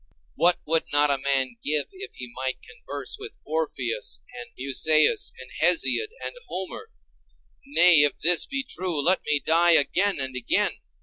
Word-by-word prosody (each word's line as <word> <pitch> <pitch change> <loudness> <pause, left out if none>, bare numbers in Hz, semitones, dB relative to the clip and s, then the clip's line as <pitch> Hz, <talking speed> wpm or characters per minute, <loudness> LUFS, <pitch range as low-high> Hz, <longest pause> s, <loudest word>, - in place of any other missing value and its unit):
What 175 +2 +2
would 165 +1 +1
not 145 0 +3
a 140 - 0
man 130 -3 0
give 150 -1 +1
if 395 +1 -10
he 125 -2 -10
might 130 0 -3
converse - - -7
with 425 +1 -10
Orpheus 120 - -3
and 120 -1 -9
Musæus 155 - +2
and - - -13
Hesiod 440 - +2 0.2
and - - -6
Homer? 190 - -7 0.8
Nay, 180 - +6
if 145 -1 +3
this 175 +1 +5
be 275 0 -3
true, 180 - -3
let 180 +6 +4
me 150 0 +2
die 170 +2 +5
again 190 +5 +2
and 130 -1 -2
again. 125 -2 +1
155 Hz, 160 wpm, -24 LUFS, 135-185 Hz, 0.8 s, Nay